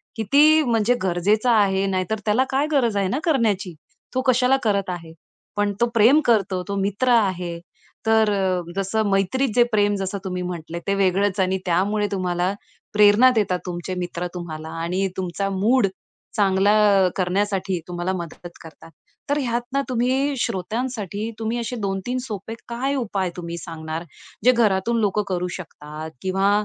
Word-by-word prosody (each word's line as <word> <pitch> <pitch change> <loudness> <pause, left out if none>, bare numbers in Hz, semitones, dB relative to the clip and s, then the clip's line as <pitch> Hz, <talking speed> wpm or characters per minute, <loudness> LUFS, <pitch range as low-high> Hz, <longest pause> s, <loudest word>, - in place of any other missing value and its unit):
किती 295 +8 +5
म्हणजे 230 -2 +2
गरजेचा 200 +6 +2
आहे 195 -1 +2
नाहीतर 190 +3 -1
त्याला 220 +4 +3
काय 275 +2 +1
गरज 235 -8 +2
आहे 195 - +1
ना 255 +9 -1
करण्याची? 215 - +1 0.4
तो 260 - +2
कशाला 255 +1 +4
करत 200 -4 +1
आहे? 165 -2 -6 0.4
पण 205 -1 +1
तो 235 - +6
प्रेम 235 +6 +6
करतो, 195 -5 +2
तो 200 - -3
मित्र 205 +6 0
आहे 180 -6 +1 0.5
तर 220 -1 +4
अ, 185 -2 0
जसं 200 +2 0
मैत्रीत 200 +7 +1
जे 245 - +6
प्रेम 205 -1 +2
जसं 195 +1 -3
तुम्ही 180 -1 -3
म्हटले 170 -1 -5
ते 195 - +2
वेगळंच 195 +1 +1
आणि 190 0 +2
त्यामुळे 200 +4 +1
तुम्हाला 180 -1 0 0.4
प्रेरणा 210 +4 +6
देतात, 185 -4 +1
तुमचे 175 0 -4
मित्र 175 0 -3
तुम्हाला 160 -3 -6
आणि 185 +3 0
तुमचा 190 +2 -2
मूड 205 +4 +2 0.5
चांगला 200 -1 +3 0.3
अ, 180 - +2
करण्यासाठी 190 0 0
तुम्हाला 175 +1 -2
मदत 175 -1 -7
करतात. 165 0 -14 0.4
तर 285 - +2
ह्यात 240 -3 -1
ना 275 - +2
तुम्ही 260 +3 +1
श्रोत्यांसाठी, 215 +1 -3
तुम्ही 225 +1 -2
असे 235 +1 -4
2-3 195 +5 -2
सोपे 215 -1 -6 0.2
काय 260 +4 -1
उपाय 200 -7 -1
तुम्ही 170 -1 -5
सांगणार, 160 -1 -6 0.4
जे 250 - +8
घरातून 230 -1 +2
लोकं 210 0 +1
करू 180 -1 -1
शकतात? 155 -3 -8
किंवा 195 +1 +1
200 Hz, 155 wpm, -22 LUFS, 180-230 Hz, 0.5 s, जे